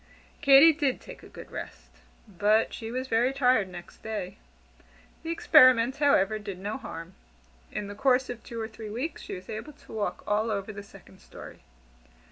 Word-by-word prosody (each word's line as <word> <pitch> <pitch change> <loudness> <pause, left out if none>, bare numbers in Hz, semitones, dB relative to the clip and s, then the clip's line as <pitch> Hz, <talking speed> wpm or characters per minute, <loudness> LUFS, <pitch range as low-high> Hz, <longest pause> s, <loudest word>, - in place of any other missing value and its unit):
Katy 280 +4 +8
did 285 -4 -1
take - - -12
a - - -14
good - - -12
rest, - - -9 0.4
but 210 +3 +1
she 225 - -6
was 255 +2 -4
very 240 +2 +2
tired 250 -7 +2
next 175 -1 -12
day. 205 -3 -5 0.8
The 325 - -7
experiment, 255 -6 +5
however, 215 -8 +3
did 200 -3 -7
no 205 +6 -4
harm. 165 -8 -9 0.6
In 210 - -4
the 200 - -7
course 255 +3 +2
of 240 -2 -7
two 230 - -7
or 220 - -3
three 220 -1 -9
weeks, 250 +10 -4
she - - -7
was 185 0 -11
able 220 +8 -7
to - - -16
walk 215 -2 -3
all 215 +2 0
over 205 0 -3
the 205 - -7
second 195 -1 -16
story. - - -12
225 Hz, 180 wpm, -27 LUFS, 205-260 Hz, 0.8 s, Katy